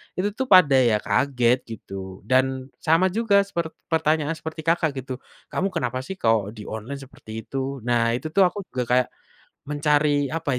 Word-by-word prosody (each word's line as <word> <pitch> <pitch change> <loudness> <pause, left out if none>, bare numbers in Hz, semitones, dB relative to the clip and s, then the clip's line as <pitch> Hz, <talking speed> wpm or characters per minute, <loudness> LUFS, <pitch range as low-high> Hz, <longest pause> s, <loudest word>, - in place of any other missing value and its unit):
itu 200 +3 0
tuh 260 +6 -3
pada 170 - +7 0.3
kaget 125 -3 +2
gitu 95 -4 -8
dan 130 +3 +1
sama 165 +4 +3
juga 205 -1 +3
sepert 170 -5 -4 0.2
pertanyaan 155 -1 +2
seperti 160 0 -6
Kakak 165 -2 +1
gitu, 130 0 -6 0.3
kamu 190 - 0
kenapa 125 +1 -1
sih 130 +9 -6
kalau 115 - +2
di 105 - -8
online 110 +6 -6
seperti 110 -4 -9
itu? 135 0 -4
Nah 115 -1 +2
itu 155 +6 -5
tuh 190 +3 +5
aku 200 +3 -5
juga 125 - -1
kayak, 125 +1 +3 0.6
mencari 145 -1 +2
apa 160 +1 -4
140 Hz, 165 wpm, -24 LUFS, 125-165 Hz, 0.6 s, pada